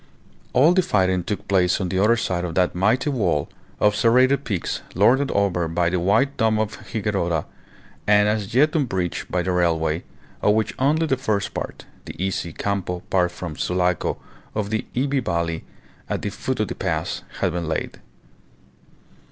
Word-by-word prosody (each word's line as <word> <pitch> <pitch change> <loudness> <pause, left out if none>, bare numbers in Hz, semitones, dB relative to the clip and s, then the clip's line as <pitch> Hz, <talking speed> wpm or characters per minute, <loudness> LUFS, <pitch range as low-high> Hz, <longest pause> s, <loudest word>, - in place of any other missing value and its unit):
All 145 +7 +5
the 185 - +4
fighting 95 - +1
took 105 - -4
place 90 -2 +3
on 95 -3 -2
the 95 +1 0
other 115 +3 +5
side 90 -6 -1
of 85 -2 -4
that 90 -1 +2
mighty 110 +10 +2
wall 90 - 0 0.3
of 105 0 +3
serrated 130 +5 +4
peaks 100 -7 -2
lorded 125 +9 +4
over 95 -4 +1
by 85 +1 0
the 90 - +1
white 110 +10 +2
dome 110 -1 +2
of 110 -1 -2
Higuerota 95 -7 -1 0.6
and 105 0 +5
as 105 +1 -1
yet 150 +5 +4
unbreached 95 - -1
by 90 0 +1
the 95 - -1
railway, 80 -2 +1 0.4
of 105 - +4
which 110 0 0
only 150 +5 +2
the 135 -4 +1
first 105 -6 -1
part, - - -6 0.2
the - - -8
easy 90 -1 -2
Campo 90 -1 -2
part 90 -2 +3
from 85 -3 -6
Sulaco 90 0 0 0.4
to 105 - +1
the 110 +2 -3
Ivie 135 +1 +1
Valley 85 -6 -2 0.4
at - - -2
the - - -2
foot - - -3
of - - -1
the - - -2
pass, - - -2 0.2
had - - +1
been 85 -1 -3
laid. 80 - -3
100 Hz, 175 wpm, -23 LUFS, 90-115 Hz, 0.6 s, All